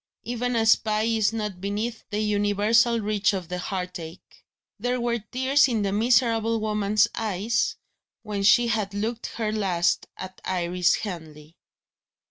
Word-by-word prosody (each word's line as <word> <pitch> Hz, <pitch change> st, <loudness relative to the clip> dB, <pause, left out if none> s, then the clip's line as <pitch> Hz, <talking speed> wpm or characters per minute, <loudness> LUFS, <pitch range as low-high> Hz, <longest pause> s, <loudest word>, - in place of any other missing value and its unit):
Even 245 Hz, +1 st, -2 dB
a 225 Hz, -1 st, +2 dB
spy 215 Hz, -1 st, +3 dB
is 220 Hz, -2 st, +2 dB
not 210 Hz, -5 st, -4 dB
beneath 215 Hz, +4 st, -3 dB
the 210 Hz, -, -2 dB
universal 210 Hz, +3 st, +2 dB
reach 210 Hz, -1 st, +1 dB
of 185 Hz, -3 st, -4 dB
the 180 Hz, 0 st, -3 dB
heartache. 180 Hz, -2 st, -7 dB, 0.4 s
There 245 Hz, +3 st, -1 dB
were 235 Hz, 0 st, 0 dB
tears 260 Hz, +6 st, +2 dB
in 225 Hz, -5 st, 0 dB
the 195 Hz, -, 0 dB
miserable 230 Hz, 0 st, +2 dB
woman's 210 Hz, -1 st, +2 dB
eyes 215 Hz, +1 st, -1 dB, 0.5 s
when 210 Hz, -2 st, -3 dB
she 225 Hz, +4 st, +5 dB
had 215 Hz, -4 st, -1 dB
looked 225 Hz, +3 st, -3 dB
her 220 Hz, -2 st, -1 dB
last 190 Hz, -5 st, 0 dB
at 185 Hz, 0 st, -9 dB
Iris 180 Hz, 0 st, +1 dB
Henley. 160 Hz, -5 st, -8 dB
210 Hz, 140 wpm, -25 LUFS, 195-230 Hz, 0.5 s, she